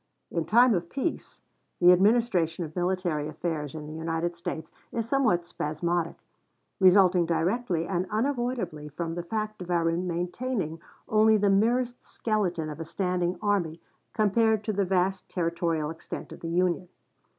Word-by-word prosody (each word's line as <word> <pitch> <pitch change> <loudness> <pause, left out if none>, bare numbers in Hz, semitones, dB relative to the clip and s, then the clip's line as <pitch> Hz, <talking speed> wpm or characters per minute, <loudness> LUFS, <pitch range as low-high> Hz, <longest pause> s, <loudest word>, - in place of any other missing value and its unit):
In 170 -2 -1
time 240 +2 +5
of 170 -2 -1
peace, 280 - -4 0.4
the 180 0 +8
administration 185 -4 +3
of 155 - -11
military 175 -4 0
affairs 155 -1 -4
in 155 -1 -6
the 155 - -8
United 165 +2 -2
States 160 -1 -5 0.2
is 230 -1 -2
somewhat 225 -10 +2
spasmodic, 170 +2 -2 0.6
resulting 185 -2 +5
directly 170 +2 0
and 180 +1 -1
unavoidably 240 - -2
from 165 +2 -4
the 175 - -3
fact 215 +3 -4
of 180 - -7
our 170 -1 +2
maintaining 180 +2 -2 0.3
only 215 0 +5
the 200 -1 +3
merest 240 +5 +1
skeleton 185 -8 -1
of 150 0 -7
a - - -3
standing 180 +1 -1
army 180 -6 0 0.3
compared 220 0 +2
to 215 - -1
the 200 0 +1
vast 185 +1 0
territorial 165 -3 -1
extent 160 - -8
of - - -9
the 165 - -5
Union. 180 +1 +1
180 Hz, 150 wpm, -27 LUFS, 165-215 Hz, 0.6 s, the